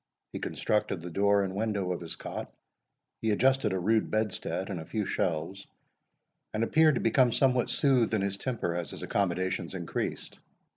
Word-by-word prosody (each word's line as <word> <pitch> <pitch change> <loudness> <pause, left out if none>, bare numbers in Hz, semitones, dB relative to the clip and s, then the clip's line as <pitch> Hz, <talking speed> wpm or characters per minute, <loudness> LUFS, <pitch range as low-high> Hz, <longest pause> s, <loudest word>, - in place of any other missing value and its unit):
He - - -4
constructed 105 -3 -1
the 90 +1 -7
door 100 +2 +3
and 95 -1 -3
window 100 -3 -1
of 90 - -3
his 85 - -5
cot, - - -6 0.7
he 110 - 0
adjusted 130 +1 +3
a 95 - 0
rude 110 +4 +1
bedstead, 105 -2 -1
and 90 - -3
a - - -6
few 105 -2 -2
shelves, 85 +3 -2 0.9
and 110 - +1
appeared 155 +4 +4
to - - -1
become 120 +2 +4
somewhat 125 0 +2
soothed 125 -6 +3
in 105 - +1
his 100 0 -1
temper 115 -6 -2
as 85 -3 -3
his - - -7
accommodations 95 -1 -1
increased. 85 -3 -4
100 Hz, 175 wpm, -29 LUFS, 95-115 Hz, 0.9 s, appeared